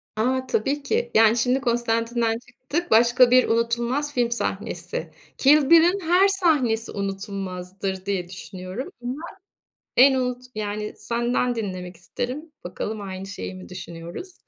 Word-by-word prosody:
A, 255 +4 0
tabii 275 +5 0
ki. 455 +11 -1
Yani, 225 +1 +6
şimdi 250 +3 +2
Constantine'den 230 -1 0
çıktık, 295 +8 -5
başka 240 +2 +6
bir 255 0 +6
unutulmaz 235 +5 0
film 240 -2 +1
sahnesi. 235 - -3 0.3
Kill 285 0 +5
Bill'in 335 +4 +6
her 360 +2 +4
sahnesi 295 - +1
unutulmazdır 195 -1 -4
diye 195 -3 -2
düşünüyorum 185 - -7
ama 255 +5 -4 0.8
en 265 +2 +7
unut 250 -1 -1
Yani 210 0 -3
senden 240 +3 0
dinlemek 185 -5 -5
isterim. 255 - -5
Bakalım 210 +4 -4
aynı 190 -1 -6
şeyi 195 -1 -6
mi 185 0 -10
düşünüyoruz? 175 - -8
235 Hz, 130 wpm, -24 LUFS, 200-260 Hz, 0.8 s, en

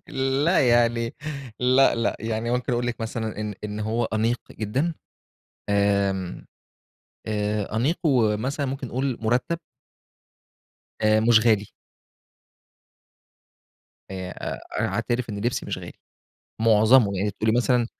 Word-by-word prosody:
لأ، 135 +2 +2
يعني 115 -1 +2 0.5
لأ، 130 +2 +5
لأ، 115 0 0
يعني 110 +1 -2
ممكن 125 +1 -1
أقول 120 0 0
لِك 120 -1 -3
مثلًا 110 -1 -4
إن 105 -1 -3
إن 105 0 -4
هو 115 +2 0
أنيق 110 +3 0
جدًا 130 +11 -1 0.8
آمم، 100 -2 0 0.8
آآ، 105 0 -2
أنيق 140 +9 +1
ومثلًا 130 +2 +1
ممكن 135 0 -4
نقول 130 0 -2
مُرتَّب. 120 +9 0 1.4
آآ، 110 0 +4
مش 115 0 +6
غالي. 110 -3 +3 2.4
آآ 95 -1 -5 0.2
أ - - -8
أنا - - +1
أعترِف 120 -1 -2
إن 100 - -5
لِبسي 120 +3 -1
مش - - -3
غالي، - - -9 0.7
مُعظَمه 110 -1 +5
يعني 100 +3 0
تقولي 110 +3 0
مثلًا 125 -1 +2
115 Hz, 120 wpm, -24 LUFS, 105-125 Hz, 2.4 s, مش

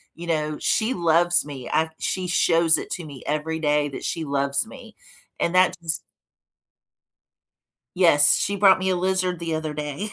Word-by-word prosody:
you 170 +1 -9
know, 155 -2 -1
she 225 +4 +1
loves 175 0 +2
me. 135 -4 -8
I 160 0 +1
she 185 -1 -2
shows 165 -2 +3
it - - -7
to 175 -3 -4
me 140 -4 -11
every 155 +2 -2
day 150 -1 +1
that 135 - -8
she 165 -2 -3
loves 140 -1 -1
me. - - -13 0.4
And 170 +2 -1
that 185 0 +4
just 165 -1 -3 1.9
Yes, 145 -5 +5
she 200 - -1
brought 195 -2 +5
me 190 0 -2
a 185 - +1
lizard 185 0 -1
the 165 -1 -3
other 155 -1 -4
day. 150 +7 -4
165 Hz, 170 wpm, -23 LUFS, 150-180 Hz, 1.9 s, Yes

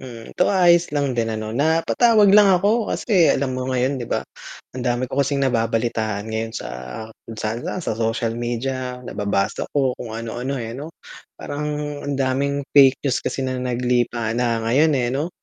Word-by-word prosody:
Hmm, 115 -3 -10
'to 180 - +2
ayos 175 -3 +4
lang 140 -2 -1
din 115 -2 -1
ano, 110 0 -5
napatawag 195 - +3
lang 205 -1 +7
ako 205 +5 +2
kasi 185 -8 +2
alam 135 -1 +1
mo 130 0 -3
ngayon 130 +1 0
'di 120 - -6
ba, - - -1 0.5
ang 130 - -6
dami 120 0 0
ko 130 +2 -1
kasing 140 0 +1
nababalitaan 115 -3 -1
ngayon 110 +1 -2
sa - - -5 0.6
kung 115 - -8
saan-saan, 115 - -4
sa - - -1
social 115 +1 -1
media, 125 +2 -4
nababasa 100 -2 -2
ko, 135 -3 +2
kung 110 -2 -6
ano-ano 120 +4 -4
eh 115 -3 -5
'no. 145 +7 -8 0.4
Parang 150 +1 -4 0.4
ang 140 - -1
daming 140 +1 0
fake 135 -1 +6
news 130 -3 +1
kasi 135 - -3
na 130 -1 -2
naglipana 120 -2 0
ngayon 145 +8 +3
eh, 120 -1 0
'no? 145 +5 -1
130 Hz, 170 wpm, -21 LUFS, 115-140 Hz, 0.6 s, lang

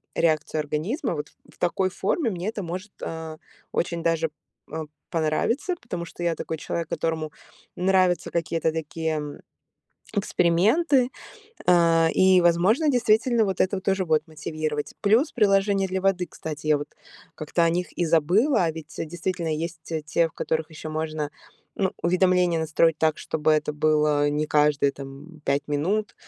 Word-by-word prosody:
реакцию 155 -1 +1
организма. 165 - -2
Вот 150 -1 -5 0.2
в - - -21
такой 185 +2 +1
форме 225 - 0
мне 185 +1 -3
это 220 -2 -4
может, 185 +4 -6
а, 160 -1 -5 0.3
очень 170 -1 -1
даже, 165 -1 +1 0.4
а, 160 0 -3 0.3
понравиться, 175 - 0
потому 180 -7 -5
что 170 - -11
я 170 -1 +1
такой 160 - -4
человек, 165 +1 -4
которому 160 -2 -2 0.4
нравятся 185 -1 +2
какие-то 165 -1 0
такие 155 -1 -3 0.8
эксперименты. 215 - +3 0.6
А, 165 -2 +5
и, 185 -1 +5
возможно, 180 - +3
действительно 235 -2 +3
вот 190 -2 -2
это 190 +1 +1
вот 190 - -7
тоже 195 -1 +1
будет 155 -2 +1
мотивировать. 155 -1 -4
Плюс 230 +8 +3
приложения 195 -3 +3
для 190 0 -2
воды, 190 -2 +1
кстати, 155 -1 -7
я 150 -1 +4
вот 145 0 -7 0.5
как-то 155 +3 0
о 165 - +4
них 175 +2 -2
и 175 - +1
забыла. 180 - +3
А 160 - 0
ведь 160 -1 -10
действительно 170 0 -2
есть 165 +1 -4
те 160 -1 -3
те, 160 +2 +1
в - - -27
которых 160 0 -2
еще 155 0 -8
можно, 155 -1 -3 0.4
ну, 190 -2 0
уведомления 180 -1 +3
настроить 160 +1 +2
так, 160 -1 +2
чтобы 155 0 0
это 150 0 0
было 150 -1 +2
не 150 +1 -1
каждые 150 -2 +3
там 140 +4 -11
5 140 +1 0
минут, 185 +10 0
165 Hz, 155 wpm, -25 LUFS, 155-190 Hz, 0.8 s, А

